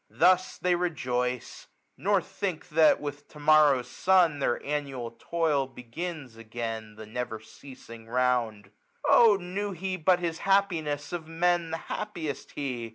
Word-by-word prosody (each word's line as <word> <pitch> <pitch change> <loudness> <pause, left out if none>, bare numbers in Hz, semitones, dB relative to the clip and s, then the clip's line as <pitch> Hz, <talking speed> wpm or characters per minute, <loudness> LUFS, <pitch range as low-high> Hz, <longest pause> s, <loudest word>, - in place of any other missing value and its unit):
Thus 185 0 +3
they 180 0 +1
rejoice 125 -8 -2 0.3
j - - -19
nor 200 0 +3
think 195 -3 -4
That, 155 0 +5
with 145 0 -6
to 150 - -14
morrow's 145 -4 +5
sun, 175 0 +3
their 120 - +1
annual 140 -5 -3
toil 150 +1 0
1231 130 - -25
Begins 135 0 -6
again 115 -1 -6
the 110 0 -9
never 115 0 -4
ceasing 115 0 -13
round. 115 -5 0 0.4
Oh 225 -4 +7
knew 195 +3 -4
he 185 +1 -3
but 180 +2 +3
his 170 -2 -3
happiness, 165 -7 0
of 165 -3 -4
Men 170 +1 +1
The 165 - -2
happiest 165 -8 -5
he 125 -5 -4
150 Hz, 150 wpm, -28 LUFS, 125-175 Hz, 0.4 s, Oh